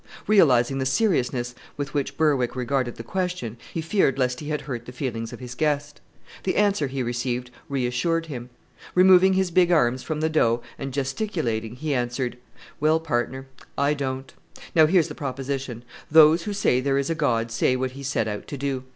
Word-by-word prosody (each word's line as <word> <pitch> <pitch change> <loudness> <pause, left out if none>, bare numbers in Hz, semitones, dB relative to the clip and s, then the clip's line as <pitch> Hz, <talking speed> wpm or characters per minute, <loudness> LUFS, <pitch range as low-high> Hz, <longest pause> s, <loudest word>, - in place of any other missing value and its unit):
Realizing 135 - +4
the 130 - -1
seriousness 130 - +1 0.2
with 145 0 -4
which 145 -2 -2
Berwick 140 -6 +2
regarded 125 -1 -1
the 115 - -8
question, 180 - -3 0.2
he 165 - -3
feared 160 -5 +1
lest 125 -1 0
he 150 - -6
had 150 -1 -1
hurt 120 -4 -6
the - - -7
feelings 120 -3 -4
of - - -9
his 125 -1 -7
guest. 145 +1 -1 0.4
The 190 - -1
answer 200 -8 +2
he 130 -1 -3
received 120 0 -2 0.2
reassured 140 +5 0
him. 125 -6 -7 0.5
Removing 185 +1 +6
his 190 -1 +1
big 175 0 +4
arms 130 -6 +3
from 155 -2 -3
the 160 - +1
dough, 120 -7 +2 0.2
and 135 0 -4
gesticulating, 135 - -2
he 150 +3 -2
answered, 125 0 -2 0.4
"Well, 155 +2 +3
partner, 130 -3 -2 0.3
I 140 +1 +2
don't. 135 -2 -4 0.4
Now 160 -2 +6
here's 175 -1 +3
the - - -7
proposition: 135 -3 -4 0.3
those 160 +2 +6
who 210 - -2
say 130 -10 +2
there 135 +1 +1
is 140 +3 0
a - - +3
God 120 -8 0
say 125 +2 +2
what 130 0 -2
He 135 +2 -10
set 135 -5 -1
out 105 -1 -5
to 145 - -6
do. 135 -1 -3
135 Hz, 185 wpm, -24 LUFS, 125-155 Hz, 0.5 s, Removing